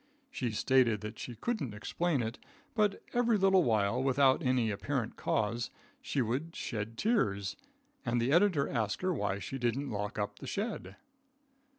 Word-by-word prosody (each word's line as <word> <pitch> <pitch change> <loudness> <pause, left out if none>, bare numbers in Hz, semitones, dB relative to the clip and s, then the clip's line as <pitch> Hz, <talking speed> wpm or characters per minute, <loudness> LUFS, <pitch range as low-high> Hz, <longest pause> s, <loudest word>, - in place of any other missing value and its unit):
She 125 - -2
stated 115 -1 +3
that 105 +1 -7
she 120 - -6
couldn't 140 - -2
explain 145 +5 0
it, 115 +3 -4 0.3
but 210 -3 +1
every 240 -2 +3
little 190 -1 +5
while, 110 0 +2
without 135 +2 +4
any 125 -5 +2
apparent 115 +3 -2
cause, 115 +3 0 0.3
she 135 - 0
would 135 +9 -2
shed 110 0 -4
tears, 100 - +1 0.5
and 120 0 +1
the 120 +3 +1
editor 170 -4 +4
asked 110 - -1
her 185 0 +2
why 100 - -1
she 120 +7 -5
didn't 125 +4 -1
lock 105 0 -3
up 105 -1 -3
the - - -8
shed. 210 +2 -3
125 Hz, 160 wpm, -32 LUFS, 110-165 Hz, 0.5 s, little